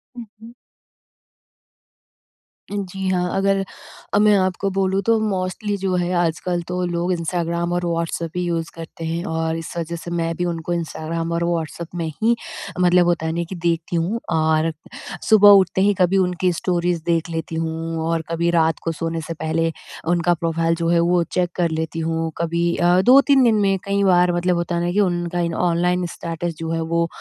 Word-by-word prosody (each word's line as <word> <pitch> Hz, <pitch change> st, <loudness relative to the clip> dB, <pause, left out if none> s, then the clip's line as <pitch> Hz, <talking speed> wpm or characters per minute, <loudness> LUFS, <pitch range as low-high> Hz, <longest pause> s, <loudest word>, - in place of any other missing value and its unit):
हुँ, 240 Hz, -, -7 dB, 0.2 s
हुँ। 230 Hz, +2 st, -12 dB, 2.2 s
जी, 195 Hz, -1 st, -4 dB
हाँ 180 Hz, -1 st, 0 dB
अगर 195 Hz, 0 st, +2 dB, 0.5 s
अ, -, -, +4 dB
मैं 210 Hz, 0 st, +5 dB
आपको 185 Hz, +1 st, 0 dB
बोलूँ 195 Hz, 0 st, +1 dB
तो 230 Hz, 0 st, +4 dB
मोस्टली 205 Hz, 0 st, -2 dB
जो 190 Hz, -1 st, -1 dB
है 180 Hz, 0 st, 0 dB
आजकल 175 Hz, +1 st, 0 dB
तो 180 Hz, 0 st, -2 dB
लोग 175 Hz, +1 st, -1 dB
इंस्टाग्राम 170 Hz, 0 st, -2 dB
और 175 Hz, 0 st, -1 dB
व्हाट्सएप 170 Hz, -1 st, -2 dB
ही 180 Hz, -, -1 dB
यूज़ 165 Hz, -1 st, -2 dB
करते 165 Hz, 0 st, -8 dB
हैं 165 Hz, +1 st, -2 dB
और 160 Hz, -3 st, -1 dB
इस 165 Hz, -, -7 dB
वजह 170 Hz, 0 st, -3 dB
से 170 Hz, +1 st, -7 dB
मैं 165 Hz, -1 st, -1 dB
भी 175 Hz, -, -2 dB
उनको 170 Hz, 0 st, -3 dB
इंस्टाग्राम 165 Hz, 0 st, -3 dB
और 170 Hz, 0 st, 0 dB
व्हाट्सएप 170 Hz, -1 st, -2 dB
में 170 Hz, -1 st, -2 dB, 0.2 s
ही 235 Hz, +1 st, +4 dB, 0.4 s
मतलब 180 Hz, 0 st, +4 dB
होता 170 Hz, -2 st, 0 dB
है 160 Hz, -, 0 dB
न 170 Hz, -, 0 dB
कि 190 Hz, -, -5 dB
देखती 170 Hz, 0 st, -1 dB
हूँ। 175 Hz, +8 st, 0 dB
और 160 Hz, 0 st, +2 dB, 0.6 s
सुबह 210 Hz, -2 st, +8 dB
उठते 190 Hz, -1 st, +5 dB
ही 205 Hz, +1 st, +4 dB
कभी 180 Hz, +2 st, +3 dB
उनकी 180 Hz, -1 st, +1 dB
स्टोरीज़ 175 Hz, -1 st, -1 dB
देख 170 Hz, 0 st, 0 dB
लेती 165 Hz, 0 st, -4 dB
हूँ 165 Hz, 0 st, -3 dB
और 165 Hz, -1 st, 0 dB
कभी 170 Hz, +1 st, 0 dB
रात 160 Hz, -2 st, +2 dB
को 165 Hz, -, -1 dB
सोने 165 Hz, 0 st, -3 dB
से 160 Hz, +2 st, -5 dB
पहले 165 Hz, +1 st, -1 dB, 0.4 s
उनका 175 Hz, 0 st, +2 dB
प्रोफ़ाइल 165 Hz, 0 st, 0 dB
जो 165 Hz, 0 st, -2 dB
है 170 Hz, 0 st, +3 dB
वो 175 Hz, +1 st, +3 dB
चेक 180 Hz, -1 st, +1 dB
कर 175 Hz, -2 st, +1 dB
लेती 160 Hz, +1 st, -3 dB
हूँ 165 Hz, 0 st, -1 dB
कभी 170 Hz, +1 st, 0 dB
अ, 175 Hz, +1 st, +4 dB
2-3 270 Hz, +4 st, +6 dB
दिन 230 Hz, -2 st, +4 dB
में 195 Hz, -1 st, +2 dB
कई 200 Hz, 0 st, +1 dB
बार 180 Hz, -2 st, +4 dB
मतलब 175 Hz, +1 st, +1 dB
होता 170 Hz, 0 st, -2 dB
है 170 Hz, -, 0 dB
ना 175 Hz, -, 0 dB
कि 205 Hz, -, 0 dB
उनका 175 Hz, -2 st, 0 dB, 0.2 s
ऑनलाइन 180 Hz, +1 st, +1 dB
स्टेटस 170 Hz, 0 st, -4 dB
जो 165 Hz, 0 st, -3 dB
है 165 Hz, -, -1 dB
वो 170 Hz, 0 st, +1 dB
170 Hz, 190 wpm, -21 LUFS, 165-180 Hz, 2.2 s, सुबह